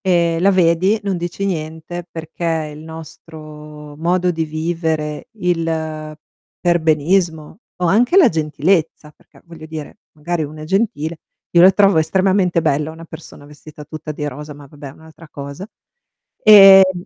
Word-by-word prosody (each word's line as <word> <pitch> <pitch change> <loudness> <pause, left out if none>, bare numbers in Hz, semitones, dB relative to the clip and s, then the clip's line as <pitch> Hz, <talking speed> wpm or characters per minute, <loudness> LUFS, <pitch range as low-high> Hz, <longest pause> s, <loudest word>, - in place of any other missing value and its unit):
e 170 -4 +1
la 195 +3 +4
vedi, 185 +4 +2
non 195 -2 -1
dici 175 +3 -5
niente, 160 0 -5
perché 160 -1 -4
il 150 - -11
nostro 155 -2 -12
modo 180 +3 0
di 165 -2 -2
vivere, 155 -1 -3
il 160 -4 -3 0.4
perbenismo 165 0 0 0.2
o 180 - +1
anche 235 - +2
la 350 -10 +7
gentilezza 155 0 -1
perché, - - -24
voglio 165 -2 -12
dire, 155 -2 -8 0.2
magari 160 +1 -3
uno 155 +1 -9
è - - -7
gentile 170 -4 -2 0.3
io 170 - +5
la 185 - +8
trovo 195 -3 +3
estremamente 185 +1 +1
bella, 150 0 0
una 165 +1 -12
persona 160 -2 -12
vestita 150 +1 -13
tutta 155 +1 -8
di 150 0 -6
rosa, 150 +2 -9
ma 145 0 -14
va 150 - -18
beh 145 -1 -9
è 135 - -11
un'altra 160 +2 -16
cosa. 140 +6 -8 0.8
Ehm 195 -3 +8
160 Hz, 150 wpm, -18 LUFS, 155-180 Hz, 0.8 s, la